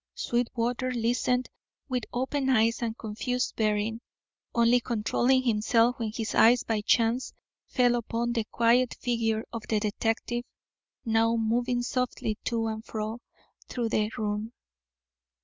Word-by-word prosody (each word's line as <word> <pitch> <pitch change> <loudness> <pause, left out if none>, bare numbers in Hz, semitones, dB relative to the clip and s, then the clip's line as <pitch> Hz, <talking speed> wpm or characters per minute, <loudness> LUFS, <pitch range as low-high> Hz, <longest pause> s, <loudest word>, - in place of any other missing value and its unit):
Sweetwater 245 +1 -1
listened 245 +1 0 0.4
with 250 -4 -2
open 265 +2 -1
eyes 230 -2 +3
and 230 -1 -2
confused 245 +3 -2
bearing, 215 +1 0 0.5
only 235 +1 +5
controlling 240 +3 +1
himself 230 +2 +2
when 225 -2 -2
his 220 -1 -3
eyes 240 +2 +5
by 220 -2 -1
chance 230 +3 +1 0.3
fell 245 -1 +3
upon 235 0 -1
the 230 -2 -1
quiet 235 +2 +2
figure 225 -3 0
of 230 - -4
the 215 - +2
detective, 225 +3 -1 0.6
now 225 0 +3
moving 240 +2 0
softly 245 -4 -2
to 230 -2 0
and 220 0 -3
fro 220 +1 -4 0.5
through 235 -2 -2
the 215 -1 +1
room. 215 +1 -2
230 Hz, 130 wpm, -28 LUFS, 220-245 Hz, 0.6 s, only